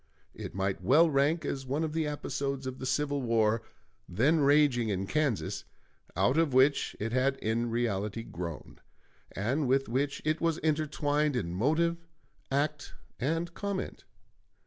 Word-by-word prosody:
It - - -8
might 95 -2 -1
well 155 - +5
rank 145 +4 +2
as 135 -1 -3
one 145 +5 -1
of 155 -1 -2
the 160 -1 0
episodes 140 -2 -3
of 130 0 -5
the 130 - -4
civil 145 +1 0
war 115 -2 +2 0.5
then 135 - +3
raging 140 -5 +4
in 95 -1 -1
Kansas, 145 0 -1 0.5
out 110 - +3
of 155 -6 +1
which 135 +2 +3
it 115 +2 -2
had 130 +2 +2
in 115 0 -1
reality 115 -2 -1
grown, 85 -6 -7 0.5
and 130 +9 0
with 135 +2 +2
which 135 +5 -1
it 155 +1 0
was 165 -1 +1
intertwined 150 -1 +1
in 85 -8 -2
motive, 160 - +1 0.5
act, 145 +1 -1 0.2
and 165 +6 -1
comment. 200 0 -4
135 Hz, 145 wpm, -30 LUFS, 115-150 Hz, 0.5 s, well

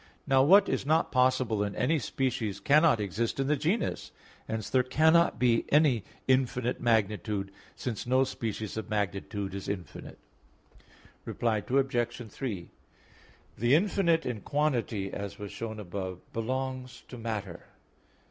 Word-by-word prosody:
Now 135 -2 +4
what 195 +8 +6
is - - -1
not 160 +4 +2
possible 125 -4 +2
in 100 -1 -3
any 155 +6 +1
species 115 -4 -2
cannot 145 +3 +4
exist 105 +5 -2
in 135 - +1
the 150 +2 +2
genus; 165 - -1 0.4
hence 110 -1 -3
there 130 - +3
cannot 160 +6 +3
be 120 -2 +3
any 145 -8 +4 0.2
infinite 125 -2 +1
magnitude, 105 -3 0 0.2
since 120 -2 -4
no 130 +1 +4
species 110 -4 -4
of 110 - -5
magnitude 100 -1 -2
is 100 -1 -5
infinite. 95 -4 -6 1.1
Reply 115 -2 -1
Obj. 125 -3 +1
3: 105 -10 -5 0.9
The 120 +5 +3
infinite 170 -2 +2
in 120 -4 -3
quantity, 120 -9 -1
as 100 -1 -5
was 105 -1 -7
shown 110 -1 -6
above, 95 -1 -5 0.2
belongs 130 +2 -3
to 125 - -9
matter. 105 -6 -5
120 Hz, 135 wpm, -29 LUFS, 105-135 Hz, 1.1 s, what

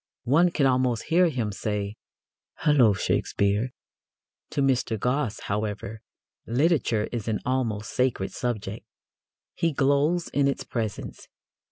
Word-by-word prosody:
One 165 +8 +4
can 150 -4 +1
almost 125 -3 +2
hear 180 0 +5
him 120 -8 -2
saying, 105 0 -3 0.7
"Hullo, 140 -8 +5
Shakespeare!" 100 +4 0 0.8
To 140 - 0
Mr. 125 -5 +1
Gosse, 125 -1 -1
however, 105 +1 -3 0.5
literature 120 -4 +2
is 115 -3 -4
an 110 -2 0
almost 115 -5 -1
sacred 125 -7 0
subject. 110 -4 -3 0.7
He 165 - 0
glows 145 +5 +2
in 140 0 +2
its 140 - -1
presence. 110 -4 -5
125 Hz, 120 wpm, -26 LUFS, 105-140 Hz, 0.8 s, hear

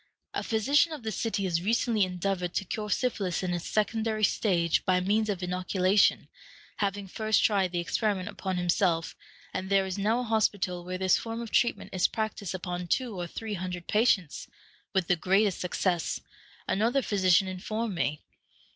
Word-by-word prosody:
A - - -1
physician 275 +9 +2
of 295 -6 -7
the 220 - -2
city 210 -1 -2
has 170 -3 0
recently 225 +1 +2
endeavored 180 -1 -2
to 195 - 0
cure 210 +2 -4
syphilis 205 -7 -1
in 180 -1 -1
its 175 -1 -3
secondary 220 +1 0
stage 170 -7 +2
by 185 -1 +3
means 210 +4 +1
of 190 -3 -2
inoculation, 185 +2 +2 0.5
having 200 -1 -2
first 215 +3 +1
tried 195 -4 +2
the 175 - -2
experiment 200 +2 -1
upon 190 -3 -3
himself, 175 -2 +1 0.4
and 185 0 -3
there 195 -1 +3
is 190 +1 -4
now 220 +5 +1
a - - -3
hospital 205 -6 0
where 185 +1 -4
this 185 -1 +3
form 225 0 -5
of 230 -2 -6
treatment 240 - +1
is 185 -1 +3
practiced 215 -4 -3
upon 180 -1 -4
two 245 +5 0
or 175 -1 -4
three 220 +4 -5
hundred 180 -2 -4
patients, 210 -7 +1 0.4
with 190 -2 +1
the 180 - +3
greatest 195 +3 +2
success, 180 -2 -1 0.5
another 235 +7 +1
physician 190 -1 +3
informed 215 +4 -3
me. 150 -4 -2
195 Hz, 170 wpm, -28 LUFS, 180-220 Hz, 0.5 s, by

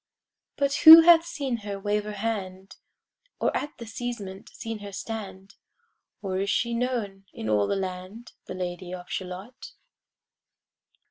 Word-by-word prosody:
But 280 -1 0
who 320 +1 +11
hath 335 0 +6
seen 275 -7 -3
her 205 -2 -6
wave 205 +1 -1
her 210 - -5
hand? 195 -3 -5 0.6
Or - - 0
at 295 - -4
the 235 - -8
casement 220 -4 -7
seen 225 -1 -7
her 205 -1 -9
stand? 195 -2 -7 0.7
Or 190 -1 -2
is 200 +1 -1
she 235 +2 0
known 230 -6 -3
in 110 - -6
all 105 -1 +2
the - - 0
land, 190 +4 -6
The 185 - -7
Lady 180 0 -5
of 180 -1 -12
Shalott? 190 +7 -7
205 Hz, 145 wpm, -26 LUFS, 190-235 Hz, 0.7 s, who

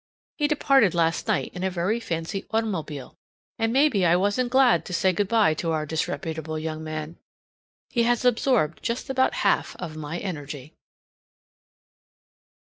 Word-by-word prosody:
He 295 - +3
departed 275 - +3
last 165 +3 +1
night 215 -3 0
in 180 - -5
a 190 - +1
very 185 +5 -1
fancy 170 -2 -4
automobile, 180 - -3 0.4
and 225 0 +1
maybe 260 -6 +3
I 175 0 +5
wasn't 205 +7 +1
glad 260 -1 +4
to 180 - -7
say 185 +2 +2
good 200 +3 0
by 215 -7 +3
to 165 +2 -2
our 155 -1 -1
disreputable 160 0 -3
young 155 0 -4
man! 155 +1 -6 0.7
He 240 - 0
has 240 +1 +1
absorbed 245 - +2
just 245 +3 -3
about 260 0 +2
half - - +2
of 155 - -7
my 155 +2 -5
energy. 150 -6 -6
180 Hz, 150 wpm, -25 LUFS, 160-230 Hz, 0.7 s, I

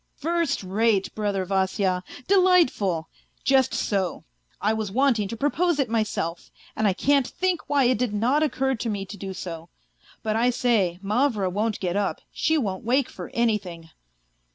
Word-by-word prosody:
" - - -47
First 325 -4 -1
rate, 200 +1 +1
brother 205 -3 -1
Vasya, 190 -1 0 0.2
delightful! 345 - +3 0.4
Just 265 -2 +3
so. 190 -4 -1 0.4
I 215 +2 +1
was 220 -3 -3
want 260 +1 +3
ing 205 - -1
to 230 - -6
propose 320 +5 +1
it 265 -6 0
myself. 205 -7 -2 0.3
And 220 - +1
I 195 - +3
can't 275 +6 +2
think 370 -2 -2
why 285 -1 +3
it 245 -2 +2
did 250 -3 0
not 240 +8 +1
occur 265 -3 +1
to 230 -1 -3
me 200 -2 -3
to 195 - -9
do 195 -1 -6
so. 165 -2 -7 0.5
But 215 -2 0
I 235 +2 +3
say, 225 -8 +1
Mavra 210 -2 +1
won't 210 +3 -1
get 180 -1 -2
up, 205 -1 -1
she 320 - +1
won't 195 -9 -2
wake 255 +3 +1
for - - -8
anything. 190 -8 -1
220 Hz, 175 wpm, -25 LUFS, 195-265 Hz, 0.5 s, delightful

